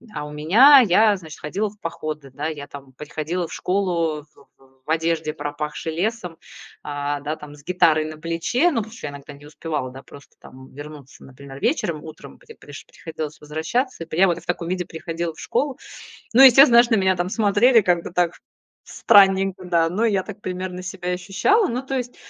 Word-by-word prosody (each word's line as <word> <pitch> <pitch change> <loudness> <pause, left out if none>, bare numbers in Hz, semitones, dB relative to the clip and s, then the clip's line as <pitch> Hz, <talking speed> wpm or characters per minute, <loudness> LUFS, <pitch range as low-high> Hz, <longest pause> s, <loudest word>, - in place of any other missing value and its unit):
а 150 - -4
у 150 - -9
меня 220 - +6
я, 205 +3 +4
значит, 160 -4 -11
ходила 200 +8 -2
в 210 - -20
походы, 155 -4 -6
да, 145 +3 -4
я 150 -3 -6
там 140 -2 -12
приходила 155 +5 -4
в - - -9
школу 170 -5 -1
в - - -22
в 135 0 -26
в - - -14
одежде, 160 -1 -1
пропахшей 150 +1 -5
лесом, 180 -1 -3 0.4
а, 145 0 -3
да, 150 +2 -4
там, 150 -1 -12
с 145 - -18
гитарой 165 -4 +2
на 155 0 -8
плече. 170 - 0
Ну, 285 - -3
потому 220 0 -4
что 230 - -7
я - - -6
иногда 140 +1 -11
не 145 +1 -16
успевала, 150 -4 -5
да, 135 +1 -11
просто 140 +1 -17
там 130 0 -15
вернуться, 145 -1 -12
например, 135 +1 -12
вечером, 170 - -1
утром, 155 0 -12
где 460 -2 -16
приш - - -12
приходилось 155 -2 -8
возвращаться. 165 - -3
Я 180 +5 +4
вот 175 -1 -1
в - - -20
таком 175 -1 -3
виде 180 -1 -2
приходила 165 +1 -5
в - - -17
школу. 275 -2 -2 0.6
Ну, 250 - +6
естественно, 255 -2 +8
знаешь, 240 - -5
на 225 - +3
меня 190 -1 +2
там 175 0 -2
смотрели 220 +4 +4
как-то 175 -5 0
так 175 -1 0 0.5
странненько, 195 -1 +3
да, 170 -2 +2
но 195 +7 -2
я 200 -4 +1
так 205 0 -10
примерно 185 -1 -5
себя 180 -1 -5
и - - 0
ощущала. 195 - +1
Ну, 250 +3 -3
то 270 - -3
есть, 245 -1 -5
170 Hz, 200 wpm, -22 LUFS, 150-200 Hz, 0.6 s, естественно